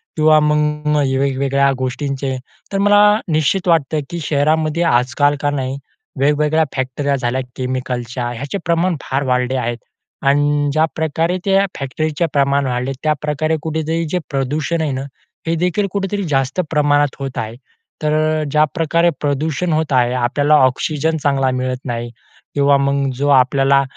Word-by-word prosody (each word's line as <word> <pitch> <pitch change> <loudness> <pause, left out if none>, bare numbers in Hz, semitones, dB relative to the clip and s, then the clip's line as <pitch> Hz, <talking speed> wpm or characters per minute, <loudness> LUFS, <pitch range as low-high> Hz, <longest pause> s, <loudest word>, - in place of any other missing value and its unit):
किंवा 155 0 +5
मग 150 0 +1 0.2
वेगवेगळ्या 140 0 +1
गोष्टींचे. 135 +1 -3 0.4
तर - - +1
मला 205 +1 +4 0.3
निश्चित 155 +5 +1
वाटतं 160 -2 +2
की 170 - -4
शहरामध्ये 155 +2 +1
आजकाल 145 +1 +2
का 145 - +1
नाही 135 -1 -3 0.4
वेगवेगळ्या 150 +3 +2
फॅक्टऱ्या 135 +2 -1
झाल्या 130 0 -1
केमिकलच्या 125 -1 -3
ह्याचे 140 +10 -4
प्रमाण 170 +1 +1
फार 135 +2 -2
वाढले 125 0 0
आहेत. 120 -1 -2 0.4
आणि 145 +1 +2
ज्याप्रकारे 160 +2 0
त्या 195 0 +3
फॅक्टरीचे 155 +4 -1
प्रमाण 140 0 +2
वाढले 125 +2 -2
त्याप्रकारे 155 +1 0
कुठेतरी 160 +1 -2
जे 180 - 0
प्रदूषण 150 +4 -1
आहे 150 -3 -1
ना, 130 0 -3 0.4
हे 165 - +1
देखील 180 +4 0
कुठेतरी 200 0 -2
जास्त 135 +6 0
प्रमाणात 145 -1 +2
होत 135 -1 -5
आहे. 110 +1 -4 0.5
तर 150 0 0 0.4
ज्या 150 +1 +4
प्रकारे 170 0 +2
प्रदूषण 150 +4 -1
होत 155 -1 0
आहे 125 -1 +3
आपल्याला 145 +5 +2
ऑक्सिजन 155 +4 0
चांगला 135 -2 +2
मिळत 130 0 -2
नाही 120 -1 -3 0.5
किंवा 140 0 +4
मग 140 0 0
जो 140 +3 -1
आपल्याला 135 +1 +4
145 Hz, 140 wpm, -18 LUFS, 135-155 Hz, 0.5 s, किंवा